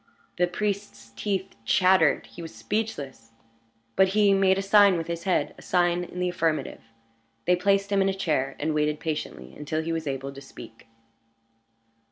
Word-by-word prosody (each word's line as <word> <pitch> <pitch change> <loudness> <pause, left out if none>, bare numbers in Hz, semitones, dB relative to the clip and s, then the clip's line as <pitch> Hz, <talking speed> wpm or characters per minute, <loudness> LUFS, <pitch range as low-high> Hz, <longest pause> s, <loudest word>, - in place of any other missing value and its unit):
The 180 - +4
priest's 195 - -4
teeth 195 - -3
chattered 185 -3 +3
he 175 - -12
was 165 - -9
speechless. 140 - -4 0.7
But 190 - +5
he 205 -2 +5
made 190 -1 +3
a - - 0
sign 200 -2 +5
with 165 - -3
his 170 0 -5
head 185 - +1
a - - -12
sign 175 -1 +1
in 175 - -11
the 180 0 0
affirmative. 160 -5 -1 0.6
They 180 - +4
placed 200 +2 +1
him 200 -1 +3
in 195 - +2
a - - 0
chair, 150 -8 -1
and 155 +2 -1
waited 150 0 0
patiently 150 - -5
until 155 +2 -3
he 165 - -3
was 160 -2 -3
able 135 0 -4
to 140 - -10
speak. 115 -5 -13
175 Hz, 175 wpm, -26 LUFS, 150-195 Hz, 0.7 s, But